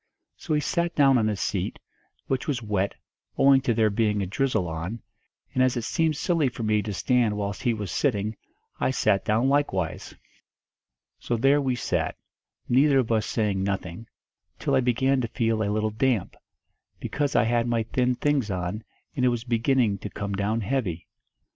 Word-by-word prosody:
So 155 - -2
he - - +2
sat 170 +3 -1
down 135 -3 +5
on 110 -1 +1
a 105 - -1
seat, - - -2 0.5
which 130 -1 -2
was 130 -6 -1
wet, 100 -2 -1 0.4
owing 135 -1 +5
to 130 - 0
there 110 -2 +3
being 105 -1 +1
a - - -2
drizzle 110 -1 0
on, 85 +8 -4 0.5
and 130 - +1
as 130 -1 +2
it 120 - -2
seemed 160 +4 0
silly 165 -6 +1
for 120 -1 -7
me 105 -1 +2
to 105 +1 -5
stand 115 +1 +1
whilst 100 -1 -3
he 120 -3 +1
was 105 -5 -5
sitting, 110 - 0 0.4
I - - +1
sat 100 -6 +1
down 110 +5 +1
likewise. 135 - -1 1.0
"So 120 - -2
there 135 +5 +4
we 130 -2 0
sat, 120 - -2 0.5
neither 135 +3 +4
of 125 -3 +1
us 110 -1 +1
saying 105 -4 0
nothing, 95 +1 -4 0.5
till - - -1
I - - +5
began 130 +2 +2
to 120 - -2
feel 115 -2 0
a 100 - 0
little 110 +1 0
damp, 115 -3 0 0.6
because 145 -1 -2
I - - +5
had 120 +1 +1
my 115 -1 +1
thin 125 +2 0
things 140 -5 0
on, 90 +3 -3 0.3
and 130 - -1
it - - +5
was 120 -2 -2
beginning 115 -3 +1
to 105 - -6
come 100 -1 -5
down 105 +3 -1
heavy. 100 -7 -2
115 Hz, 185 wpm, -25 LUFS, 105-130 Hz, 1.0 s, down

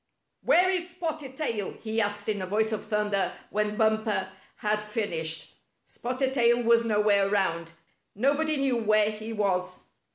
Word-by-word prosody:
"Where 370 -6 +4
is 360 -1 -1
Spotted 315 -6 -5
Tail?" 230 -10 -2
he 220 0 -2
asked 205 0 -2
in 210 -2 -1
a 185 - -4
voice 220 +3 +1
of 215 - -3
thunder 210 -2 0 0.2
when 210 0 0
Bumper 220 -3 +1 0.3
had 210 0 -1
finished. 175 -7 -2 0.3
Spotted 260 +2 -2
Tail 240 -2 +3
was 235 0 +4
nowhere 210 -3 +3
around. 170 -5 0 0.4
Nobody 290 +7 +1
knew 270 -3 +1
where 215 -1 +3
he 215 +1 -7
was. 185 -4 -1
215 Hz, 150 wpm, -27 LUFS, 205-245 Hz, 0.4 s, Where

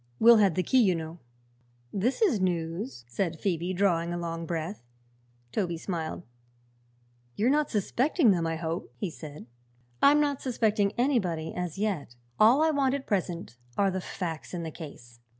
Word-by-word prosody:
Will 235 0 +8
had 200 -6 +4
the 185 - +1
key, 260 +5 +4
you 190 -6 +3
know." 160 +1 -6 0.7
"This 240 - +1
is 300 - +3
news," 170 - -2
said 160 +6 -2
Phoebe, 175 -2 -1
drawing 175 -3 +1
a 175 - -2
long 165 -1 -4
breath. 170 +4 -3 0.7
Toby 175 - -1
smiled. 165 -1 -4 1.1
"You're 230 +5 +2
not 300 0 +2
suspecting 245 - +2
them, 170 -3 +1
I 165 - -1
hope?" 165 +1 -4
he 195 -5 -3
said. 150 -6 -9 0.6
"I'm 290 +1 +6
not 285 -2 +1
suspecting 215 -5 +1
anybody, 190 - 0
as 180 -2 -4
yet. 190 - -2 0.2
All 240 +8 +6
I 320 - +4
want 275 -2 +2
at 280 - -5
present 175 - -2 0.2
are 200 -1 +3
the 190 0 -2
facts 170 -2 -5
in 170 - -3
the 160 - -5
case. 120 -7 -11
185 Hz, 165 wpm, -28 LUFS, 165-225 Hz, 1.1 s, Will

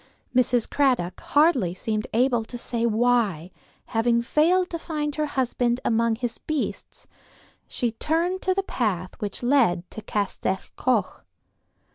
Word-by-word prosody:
Mrs. 245 -2 +3
Cradock 255 -11 +1
hardly 285 - +2
seemed 215 +2 -2
able 240 0 +2
to 245 - -7
say 235 -1 -1
why, 220 -7 +1 0.3
having 235 +1 +1
failed 355 +8 +2
to 335 - -3
find 300 -3 -3
her 305 0 -1
husband 245 -3 0
among 230 0 +2
his 240 0 -4
beasts, 310 -3 -4 0.6
she 240 -2 -1
turned 335 +9 -1
to 375 0 +1
the 390 - 0
path 190 - -2
which 210 +1 -5
led 235 -10 +3
to 220 - -7
Castell 200 -2 -1 0.2
Coch. 235 -7 0
240 Hz, 135 wpm, -25 LUFS, 220-290 Hz, 0.6 s, Mrs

